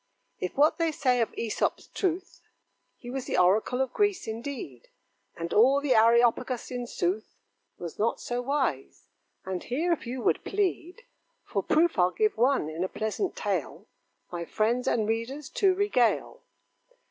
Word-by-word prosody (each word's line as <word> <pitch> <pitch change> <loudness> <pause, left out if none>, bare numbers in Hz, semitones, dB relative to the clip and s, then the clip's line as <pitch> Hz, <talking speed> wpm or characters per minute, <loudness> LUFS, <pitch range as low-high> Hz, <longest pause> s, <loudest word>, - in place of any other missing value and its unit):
If 180 - -4
what 300 +5 +4
they 330 -1 +2
say 255 -5 +1
of 225 - 0
Æsop's 225 -2 -2
truth, 370 -1 -3 0.6
He 245 -2 -9
was 265 0 -4
the - - -1
oracle 215 +8 +3
of 265 - -1
Greece 410 - +1
indeed; 225 - -6 0.5
And 170 0 -4
all 260 +6 +5
the 285 -2 +2
Areopagus, 235 +2 +3
in 245 -1 -4
sooth, 195 +1 -2 0.4
Was 170 -2 -8
not 225 +2 +1
so 245 0 -3
wise. 260 - -2 0.4
And 185 -1 -3
here, 325 +8 0
if 310 - -5
you 250 +1 -4
would - - +1
plead 390 +1 -2 0.4
For - - -2
proof, 325 - +2
I'll 180 0 +5
give 430 - +1
one, 250 - +2
in 160 +3 -3
a 190 - -2
pleasant 220 - -2
tale, - - -3 0.5
My 175 -1 -4
friends 230 +8 0
and 220 -3 +1
readers 235 +6 -3
to 385 -2 +2
regale. 320 - +1
245 Hz, 160 wpm, -28 LUFS, 220-295 Hz, 0.6 s, all